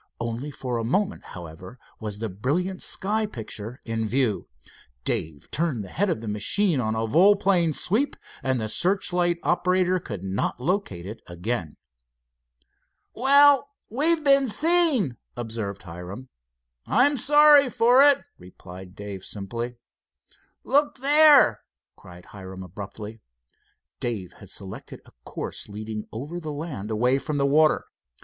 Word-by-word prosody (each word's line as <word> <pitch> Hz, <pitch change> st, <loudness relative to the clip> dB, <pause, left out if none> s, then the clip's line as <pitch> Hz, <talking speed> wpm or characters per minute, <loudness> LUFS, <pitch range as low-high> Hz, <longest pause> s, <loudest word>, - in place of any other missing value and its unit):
Only 115 Hz, +5 st, -4 dB
for 125 Hz, -4 st, -4 dB
a -, -, -3 dB
moment, 195 Hz, -, -1 dB
however, 90 Hz, +6 st, -10 dB, 0.2 s
was 105 Hz, -3 st, -5 dB
the 115 Hz, +1 st, -3 dB
brilliant 150 Hz, -, -2 dB
sky 215 Hz, +2 st, -1 dB
picture 115 Hz, -, -6 dB
in 115 Hz, -1 st, -2 dB
view. 120 Hz, -3 st, 0 dB, 0.6 s
Dave 75 Hz, -3 st, -3 dB
turned 150 Hz, -9 st, 0 dB
the 95 Hz, -, -10 dB
head 200 Hz, -, 0 dB
of 110 Hz, -, -2 dB
the 115 Hz, -, -7 dB
machine 140 Hz, -, +1 dB
on 110 Hz, -2 st, -1 dB
a 110 Hz, 0 st, -1 dB
volplane 180 Hz, -, +4 dB
sweep, 220 Hz, -, 0 dB, 0.3 s
and 130 Hz, -2 st, 0 dB
the 110 Hz, -, -2 dB
searchlight 175 Hz, -, +1 dB
operator 180 Hz, +1 st, +1 dB
could 105 Hz, -, -7 dB
not 95 Hz, +5 st, -2 dB
locate 130 Hz, -, -2 dB
it 105 Hz, +4 st, -8 dB
again. 85 Hz, -1 st, -4 dB, 1.4 s
"Well, 280 Hz, +1 st, +5 dB, 0.2 s
we've 315 Hz, +6 st, +1 dB
been 275 Hz, -2 st, +4 dB
seen," 280 Hz, -, +3 dB, 0.2 s
observed 115 Hz, -4 st, -5 dB
Hiram, 90 Hz, +8 st, -9 dB, 0.6 s
"I'm 275 Hz, +6 st, +3 dB
sorry 295 Hz, +1 st, +6 dB
for 245 Hz, +3 st, +4 dB
it," 285 Hz, -1 st, +5 dB, 0.2 s
replied 90 Hz, +1 st, -12 dB
Dave 100 Hz, -2 st, -8 dB
simply. 115 Hz, +4 st, -5 dB, 0.9 s
"Look 290 Hz, +2 st, +1 dB
there!" 285 Hz, -, +6 dB, 0.3 s
cried 90 Hz, 0 st, -14 dB
Hiram 95 Hz, -1 st, -10 dB
abruptly. 105 Hz, +4 st, -9 dB, 0.8 s
Dave 105 Hz, -7 st, -4 dB
had -, -, -14 dB
selected -, -, -8 dB
a -, -, -18 dB
course -, -, -6 dB
leading 105 Hz, +1 st, -6 dB
over 145 Hz, +10 st, -6 dB
the 155 Hz, -3 st, -6 dB
land, 145 Hz, -9 st, -6 dB
away 125 Hz, +5 st, +1 dB
from 150 Hz, +1 st, -3 dB
the 140 Hz, -, +2 dB
water. 155 Hz, +2 st, +3 dB
130 Hz, 135 wpm, -25 LUFS, -, 1.4 s, sorry